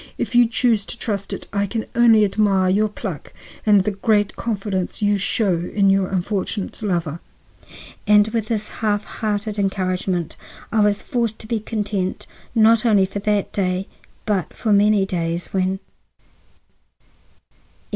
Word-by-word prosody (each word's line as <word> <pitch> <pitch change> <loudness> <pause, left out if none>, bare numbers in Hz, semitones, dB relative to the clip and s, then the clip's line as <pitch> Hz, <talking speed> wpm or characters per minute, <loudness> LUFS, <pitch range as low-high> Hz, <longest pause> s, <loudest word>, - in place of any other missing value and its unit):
If - - -3
you 240 -1 +6
choose 230 -2 +1
to - - -5
trust 200 -4 -3
to - - -2
it, - - -11
I 200 0 0
can 220 +3 -3
only 230 -3 +5
admire 195 -2 +2
your 210 +3 +2
pluck 195 - -7 0.3
and 205 -3 +5
the 210 - 0
great 205 +1 +1
confidence 200 -3 -3
you 205 0 +3
show 195 -2 +1
in 195 -2 +3
your 195 -1 +2
unfortunate 195 +2 -3
lover." 170 -6 -2 0.9
And 210 0 +6
with 220 -1 -2
this 215 -2 -2
half 210 -1 +1
hearted 210 -1 -3
encouragement 185 -3 -1 0.3
I 225 - +1
was 205 -1 +2
forced 235 -3 -1
to 220 - -10
be 230 -1 -1
content, 205 -3 -3 0.3
not 225 +1 +5
only 210 -5 +4
for 195 +2 -5
that 205 -1 -1
day, 185 -1 -1 0.4
but 195 -6 -1
for 220 -3 0
many 205 -1 +4
days, 170 -2 -2
when— 190 0 0 0.4
XI. - - -39
205 Hz, 155 wpm, -21 LUFS, 190-215 Hz, 0.9 s, you